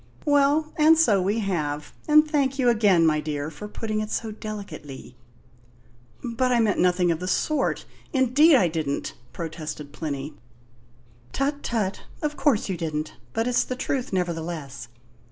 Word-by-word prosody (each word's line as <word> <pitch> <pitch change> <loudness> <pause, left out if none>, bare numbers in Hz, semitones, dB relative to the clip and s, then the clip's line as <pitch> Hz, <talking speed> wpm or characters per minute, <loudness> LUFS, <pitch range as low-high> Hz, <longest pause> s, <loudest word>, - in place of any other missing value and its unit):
Well, 290 +1 +3
and 315 +1 +6
so 220 -12 +4
we 205 +5 0
have; 150 -7 -2
and 305 0 +6
thank 275 -3 0
you 250 -3 +3
again, 205 -7 +4
my 155 -1 +3
dear, 150 0 -3
for 160 +7 -8
putting 215 0 -3
it 215 - -4
so 220 0 -3
delicately." 195 - -8 1.1
"But 250 +1 0
I 240 - +3
meant 215 -4 +2
nothing 180 -1 +3
of 165 - -1
the 180 - -4
sort 280 +9 0 0.3
indeed 275 +4 +5
I 190 -9 +4
didn't!" 155 -4 -3 0.2
protested 155 -2 -6
Plinny. 145 -1 -4 1.0
"Tut, 285 +1 -1
tut! 210 -5 -2 0.2
Of 300 0 -1
course 275 -9 +2
you 190 - -2
didn't, 155 -2 -3 0.2
but 225 0 0
it's 250 - +2
the 255 - -4
truth 260 0 -2
nevertheless. 165 - -3
205 Hz, 155 wpm, -25 LUFS, 160-260 Hz, 1.1 s, and